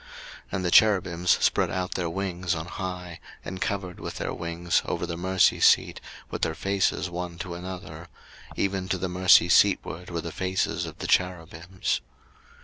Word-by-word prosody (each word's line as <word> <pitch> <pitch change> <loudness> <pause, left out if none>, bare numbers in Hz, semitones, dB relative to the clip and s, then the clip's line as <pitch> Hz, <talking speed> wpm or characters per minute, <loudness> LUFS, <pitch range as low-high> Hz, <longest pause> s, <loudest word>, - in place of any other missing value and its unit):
02:037:009 - - -19 0.4
And 95 -1 -1
the 90 - 0
cherubims 90 -5 +4 0.2
spread - - +2
out 95 0 -3
their 85 -2 -2
wings 90 -1 -2
on 80 0 -4
high, 90 -1 -6 0.3
and 95 0 -6
covered 95 -3 -3
with - - -6
their - - -3
wings 85 0 -1
over - - -2
the 85 -1 -4
mercy 95 +1 +2
seat, - - +4 0.3
with - - -4
their 80 - 0
faces 95 0 0
one 90 -1 -5
to 90 -1 -6
another; 85 -2 -8 0.5
even 95 -1 -1
to 95 - 0
the 95 +1 -2
mercy 90 -1 +5
seatward 90 0 +2
were 85 -1 -3
the 85 +1 -6
faces 95 +2 -1
of - - -9
the - - -6
cherubims. 90 0 -1
90 Hz, 170 wpm, -26 LUFS, 85-95 Hz, 0.5 s, mercy